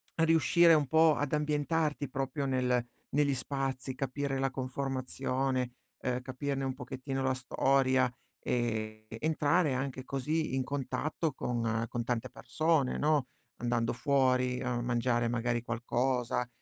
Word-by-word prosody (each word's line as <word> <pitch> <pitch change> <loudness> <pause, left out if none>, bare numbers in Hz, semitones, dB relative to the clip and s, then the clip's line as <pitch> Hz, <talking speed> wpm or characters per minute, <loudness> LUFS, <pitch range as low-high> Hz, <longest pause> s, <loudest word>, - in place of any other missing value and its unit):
riuscire 165 +1 +5
un 150 -3 +3
po' 160 +2 +5
ad 145 0 -2
ambientarti 150 -1 0
proprio, 135 +1 -2
nel 125 -2 +1 0.3
negli 145 -1 +3
spazi, 135 0 -3
capire 135 +1 -2
la 135 - +1
conformazione, 130 -1 -2 0.3
ehm, 125 0 -1
capirne 135 +1 -3
un 135 -1 -1
pochettino 130 +1 -4
la 130 0 +1
storia 130 0 +2 0.3
ed 110 -3 -2
entrare 155 +1 +2
anche 130 0 -3
così 145 +2 -1
in 130 - +1
contatto 140 +4 -2
con 115 -2 -1
con 120 - -2
tante 120 +1 -2
persone, 155 -5 +1
no. 150 -3 +2 0.3
Andando 120 -1 0
fuori 125 -1 +2
a 125 -2 -1
mangiare 120 0 +1
magari 120 0 0
qualcosa, 120 +1 -1
130 Hz, 125 wpm, -31 LUFS, 125-145 Hz, 0.3 s, riuscire